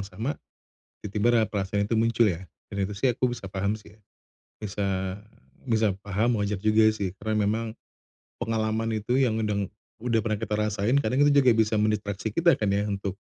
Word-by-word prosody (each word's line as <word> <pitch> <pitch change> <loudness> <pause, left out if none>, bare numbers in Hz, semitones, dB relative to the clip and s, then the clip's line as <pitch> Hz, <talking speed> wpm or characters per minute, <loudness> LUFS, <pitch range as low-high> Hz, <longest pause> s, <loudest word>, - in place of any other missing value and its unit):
sama, 110 +9 -3 0.7
tiba-tiba 110 +3 +2
ra - - +4
perasaan 100 -1 -1
itu 115 - 0
muncul 115 0 +3
ya? 90 0 -2 0.2
Dan 100 -1 -2
itu 100 - -3
sih, 100 +6 0
aku 125 -1 +1
bisa 115 -5 -6
paham 100 +3 -2
sih. 105 0 -17 0.6
Bisa 95 -2 -2 0.5
bisa 110 -3 +3
paham, 105 +2 0
wajar 100 0 -1
juga 110 +2 +4
sih, 100 -4 -2
karena 105 -1 0
memang 110 +2 -2 0.6
pengalaman 110 0 -1
itu, 120 +5 -1
yang 120 -5 +2
udang 105 -2 -1 0.3
udah 115 -2 +2
pernah 110 -1 -1
kita 105 0 -2
rasain, 105 +5 +1
kadang 130 +4 +2
itu 145 - +5
juga 130 -5 +5
bisa 110 -1 +2
mendistraksi 105 0 -1
kita 170 0 +5
kan 105 - 0
ya, 100 +1 +1
untuk 100 -2 -3
105 Hz, 175 wpm, -26 LUFS, 100-115 Hz, 0.7 s, itu